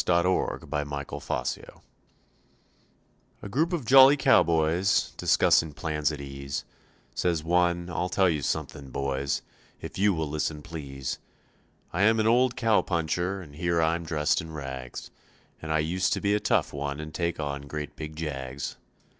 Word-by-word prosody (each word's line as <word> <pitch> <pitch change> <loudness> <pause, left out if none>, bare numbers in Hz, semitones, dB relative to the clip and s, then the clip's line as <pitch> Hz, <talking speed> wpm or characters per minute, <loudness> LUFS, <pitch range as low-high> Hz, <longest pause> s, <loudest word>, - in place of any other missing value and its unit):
WHEN 85 0 +3
WORK - - -2
IS - - -13
DONE 75 -1 -1 0.2
THIS - - -6
FALL - - -4 1.6
A - - -5
group 155 - +1
of 165 -8 -2
jolly 135 +3 +8
cowboys, 85 - +3
discussing 80 -2 +3
plans 75 -1 -1
at 75 - -6
ease, 70 0 -5 0.5
Says 85 -3 0
one, 85 +1 +2
"I'll 90 +1 -2
tell 95 +1 +3
you 80 -4 0
something, 70 -2 -3
boys, 70 0 -2 0.4
if - - -7
you 100 -1 +4
will 80 -1 -2
listen, 75 0 -3
please. 70 -6 -5 0.7
I 90 - 0
am 110 +2 +4
an 110 - +2
old 120 +2 +4
cow 115 -2 +3
puncher 90 +3 -1
and 75 -4 -14
here 85 +2 0
I'm 85 +1 +1
dressed 80 0 +1
in 80 -1 -9
rags, 65 -4 -7 0.5
And 80 - -5
I 80 - +3
used 85 +5 +1
to - - -1
be 100 0 +1
a 105 - +2
tough - - +1
one 70 0 -3
and 75 0 -7
take 85 0 -2
on 70 -1 -4
great 75 0 -5
big 75 0 -7
jags. 70 -3 -5
80 Hz, 165 wpm, -27 LUFS, 75-90 Hz, 1.6 s, jolly